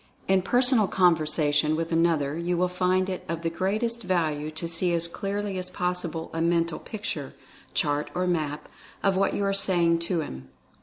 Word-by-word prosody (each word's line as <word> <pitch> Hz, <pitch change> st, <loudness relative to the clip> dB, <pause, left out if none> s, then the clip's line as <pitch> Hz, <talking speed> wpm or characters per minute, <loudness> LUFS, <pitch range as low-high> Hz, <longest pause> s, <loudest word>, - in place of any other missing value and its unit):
In 190 Hz, 0 st, +4 dB
personal 245 Hz, +1 st, +3 dB
conversation 155 Hz, -4 st, +2 dB
with 165 Hz, +1 st, -3 dB
another 165 Hz, -4 st, +2 dB
you 170 Hz, +1 st, -1 dB
will 180 Hz, +1 st, +2 dB
find 185 Hz, +1 st, +1 dB
it 185 Hz, -1 st, -4 dB
of 165 Hz, 0 st, -3 dB
the 165 Hz, -, 0 dB
greatest 215 Hz, +7 st, -1 dB
value 155 Hz, -6 st, 0 dB
to 160 Hz, +2 st, -3 dB
see 170 Hz, +1 st, 0 dB
as 170 Hz, 0 st, +1 dB
clearly 200 Hz, +2 st, -3 dB
as 185 Hz, 0 st, -5 dB
possible 180 Hz, -2 st, -3 dB
a 165 Hz, -, -2 dB
mental 170 Hz, 0 st, +1 dB
picture, 185 Hz, -10 st, -5 dB, 0.4 s
chart 145 Hz, +1 st, +1 dB
or 180 Hz, -, 0 dB
map, 155 Hz, -4 st, -1 dB, 0.4 s
of 195 Hz, -1 st, +3 dB
what 195 Hz, +1 st, +1 dB
you 205 Hz, -, -1 dB
are 195 Hz, -, +1 dB
saying 175 Hz, -4 st, +3 dB
to 170 Hz, 0 st, -1 dB
him. 65 Hz, -, -8 dB
170 Hz, 175 wpm, -26 LUFS, 160-185 Hz, 0.4 s, In